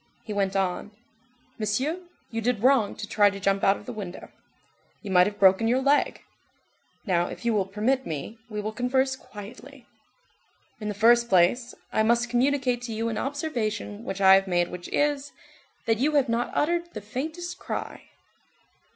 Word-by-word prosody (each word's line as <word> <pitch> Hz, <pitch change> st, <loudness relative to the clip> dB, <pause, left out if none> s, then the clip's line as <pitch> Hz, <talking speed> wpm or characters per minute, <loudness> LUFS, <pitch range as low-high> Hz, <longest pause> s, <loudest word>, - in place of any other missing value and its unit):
He 215 Hz, -, -5 dB
went 200 Hz, -1 st, 0 dB
on:— 190 Hz, +1 st, -1 dB, 0.7 s
"Monsieur, 255 Hz, -, -1 dB, 0.3 s
you 225 Hz, 0 st, -2 dB
did 230 Hz, -2 st, -1 dB
wrong 255 Hz, -6 st, +4 dB
to 215 Hz, -, -6 dB
try 205 Hz, -1 st, +4 dB
to 200 Hz, 0 st, -7 dB
jump 195 Hz, 0 st, +1 dB
out 195 Hz, +1 st, +4 dB
of -, -, -14 dB
the 250 Hz, -, -6 dB
window. 195 Hz, -5 st, -7 dB, 0.7 s
You 200 Hz, -, -5 dB
might 180 Hz, 0 st, +6 dB
have 205 Hz, 0 st, -5 dB
broken 195 Hz, +3 st, +5 dB
your 245 Hz, +3 st, +3 dB
leg. 280 Hz, +2 st, +1 dB, 0.8 s
Now, 175 Hz, -4 st, +1 dB
if -, -, -9 dB
you 235 Hz, -, +2 dB
will 200 Hz, -3 st, +1 dB
permit 230 Hz, +7 st, 0 dB
me, 160 Hz, +9 st, -5 dB
we 210 Hz, -1 st, -4 dB
will 215 Hz, +1 st, -3 dB
converse 260 Hz, +3 st, 0 dB
quietly. 210 Hz, -3 st, -12 dB, 0.9 s
In 210 Hz, -, -5 dB
the 210 Hz, -, -3 dB
first 235 Hz, +3 st, +4 dB
place, 190 Hz, +7 st, +3 dB, 0.2 s
I -, -, +3 dB
must 235 Hz, +2 st, +2 dB
communicate 255 Hz, -1 st, +1 dB
to 240 Hz, -2 st, -5 dB
you 225 Hz, +1 st, -1 dB
an 220 Hz, -1 st, -3 dB
observation 230 Hz, -8 st, -3 dB
which 195 Hz, -3 st, -5 dB
I 190 Hz, 0 st, +8 dB
have 195 Hz, 0 st, +4 dB
made 175 Hz, -1 st, +1 dB
which 180 Hz, -1 st, -7 dB
is, 290 Hz, -1 st, 0 dB, 0.5 s
that 225 Hz, -1 st, +1 dB
you 295 Hz, +4 st, +2 dB
have 280 Hz, -4 st, +3 dB
not 235 Hz, +1 st, 0 dB
uttered 345 Hz, +2 st, 0 dB
the 215 Hz, -, -5 dB
faintest 315 Hz, -, -5 dB
cry." -, -, -5 dB
225 Hz, 175 wpm, -26 LUFS, 200-260 Hz, 0.9 s, I